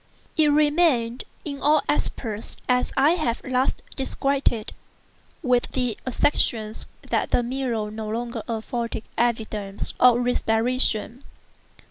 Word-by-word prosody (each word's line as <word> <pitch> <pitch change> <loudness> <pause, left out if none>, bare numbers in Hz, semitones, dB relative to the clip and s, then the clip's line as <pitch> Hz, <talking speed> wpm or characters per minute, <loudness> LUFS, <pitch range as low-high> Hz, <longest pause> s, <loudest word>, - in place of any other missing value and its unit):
It 310 -1 +5
remained 290 -5 +2 0.2
in 280 -2 -5
all 300 0 +4
respects 220 -6 0
as 250 0 +2
I 290 +4 +5
have 305 -10 0
last 255 0 0
described 275 +1 +1
it, 220 -3 -5 0.7
with 250 -3 +2
the 250 -4 0
exception 230 -4 +1 0.3
that - - 0
the 245 - +2
mirror 240 -4 -2
no 215 0 -5
longer 235 +1 -3
afforded 230 0 -3
evidence 220 -4 -2
of 245 -1 +7
respiration. 240 0 +1
245 Hz, 115 wpm, -24 LUFS, 225-270 Hz, 0.7 s, of